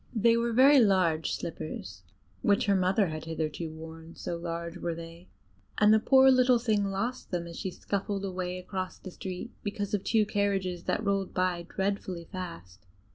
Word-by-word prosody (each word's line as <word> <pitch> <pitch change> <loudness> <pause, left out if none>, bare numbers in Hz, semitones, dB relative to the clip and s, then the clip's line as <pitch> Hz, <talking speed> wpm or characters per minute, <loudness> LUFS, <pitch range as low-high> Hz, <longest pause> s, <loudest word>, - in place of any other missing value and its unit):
They 230 +1 +4
were 235 0 +1
very 270 +4 +7
large 185 -7 +3
slippers, 100 - -6 0.4
which 205 -1 +3
her 200 - +3
mother 190 +1 +2
had 155 0 -5
hitherto 160 0 -3
worn; 160 +1 -10
so 170 - -4
large 170 0 -5
were 170 -1 -3
they; 165 +1 -10 0.5
and 210 0 +6
the 220 - +6
poor 265 +3 +6
little 255 -1 +5
thing 220 -4 +1
lost 200 +6 -3
them 175 -2 -2
as 170 0 -8
she 190 - -2
scuffled 200 +1 -3
away 185 -1 -3
across 185 0 -5
the 185 - -9
street, 185 +6 -6
because 205 -1 -4
of 200 -2 0
two 220 -2 +3
carriages 195 -4 -1
that 220 - -1
rolled 195 -1 0
by 180 -2 0
dreadfully 190 -3 -2
fast. 105 - -8
185 Hz, 175 wpm, -29 LUFS, 170-205 Hz, 0.5 s, very